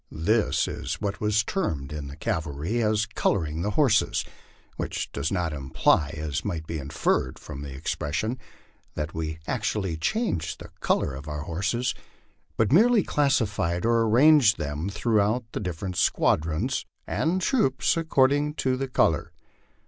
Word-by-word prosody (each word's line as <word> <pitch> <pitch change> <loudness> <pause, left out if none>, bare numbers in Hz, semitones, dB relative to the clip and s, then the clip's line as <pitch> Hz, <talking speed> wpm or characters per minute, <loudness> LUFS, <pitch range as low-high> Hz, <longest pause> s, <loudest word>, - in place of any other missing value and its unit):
This 85 -1 +1
was - - -4
what 100 -1 -3
is 105 0 +2
termed 75 - -2
in 75 -2 -5
the 70 - -8
cavalry 80 +8 -2 0.2
" 110 -1 -8
coloring 80 -4 0
the 105 - 0
horses," 135 -8 +3 0.5
which - - -4
does 80 - -2
not 90 -5 -1
imply, 70 +2 +1
as 75 0 -3
might 85 -6 -3
be 80 -1 -4
inferred 65 -2 -1
from 70 - -8
the 70 -2 -7
expression, 80 - -2 0.6
that 75 +1 -3
we 80 -1 -3
actually 105 -7 -1
changed 210 - -1
the - - -11
color 70 - +1
of 70 +3 -8
our 75 -1 -4
horses, 100 +10 -1 0.6
but 110 -2 +2
merely 225 +3 +5
classified 110 - +1
or 115 0 +3
arranged 120 0 +5
them 75 +5 -3
throughout 110 +2 +1
the - - -3
different 90 0 -4
squad 80 - +2
ions 100 +12 -1 0.2
and 170 +4 0
troops 180 - +2
according 145 -2 +2
to 130 -3 0
the 135 +1 -2
color. 80 - +1
100 Hz, 150 wpm, -26 LUFS, 80-125 Hz, 0.6 s, merely